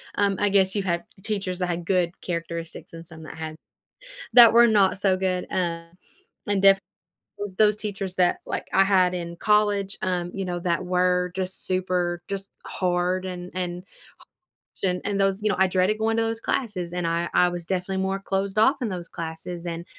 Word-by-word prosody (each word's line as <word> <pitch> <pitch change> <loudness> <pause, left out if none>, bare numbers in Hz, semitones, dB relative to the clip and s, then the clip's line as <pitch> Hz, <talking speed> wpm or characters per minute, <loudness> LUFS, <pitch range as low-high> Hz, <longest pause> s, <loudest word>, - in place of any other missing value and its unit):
um, 200 -1 +2
I 205 - +2
guess 190 -1 +3
you 200 - 0
had 170 -2 -1 0.2
teachers 195 -4 -2
that 180 - 0
had 175 -1 -3
good 180 -1 0
characteristics 170 -1 -5
and 165 0 -9
some 160 -1 -12
that 155 +1 -10
had 160 -1 -6 0.8
that 235 -2 +10
were 235 +1 +7
not 205 -4 +3
so 190 -1 +2
good, 185 -1 -1
uh, 170 -2 -1 0.6
and 200 -1 +1
def 195 0 +6 0.6
those 205 -2 -5
those 210 -1 +4
teachers 200 -3 -5
that, 180 -1 +3
like, - - -3
I 195 - +5
had 185 -2 +3
in 170 -1 -5
college, 205 -1 +1
um, 180 -2 -1
you 195 - -3
know, 175 -1 -3
that 170 0 -1
were 180 0 +1
just 185 0 -4
super 180 -2 -1
just, 195 0 -5 0.2
hard 180 0 0
and 180 -1 -6
and 180 0 -4 1.0
h - - -3
and 180 0 -1
and 200 -1 -1
those 195 +1 +1
you 215 - +2
know, - - 0
I 190 - +5
dreaded 185 +3 +1
going 225 +1 +1
to 230 - +2
those 225 0 -2
classes, 185 -9 -2
and 180 -1 -1
I 170 +1 0
I 180 - +5
was 175 -1 -5
definitely 190 +1 -2
more 195 +1 -1
closed 195 +1 -2
off 265 +6 +5
in 235 - 0
those 180 -3 -5
classes, 170 +1 -6
and, 170 0 -4
185 Hz, 200 wpm, -25 LUFS, 175-195 Hz, 1.0 s, that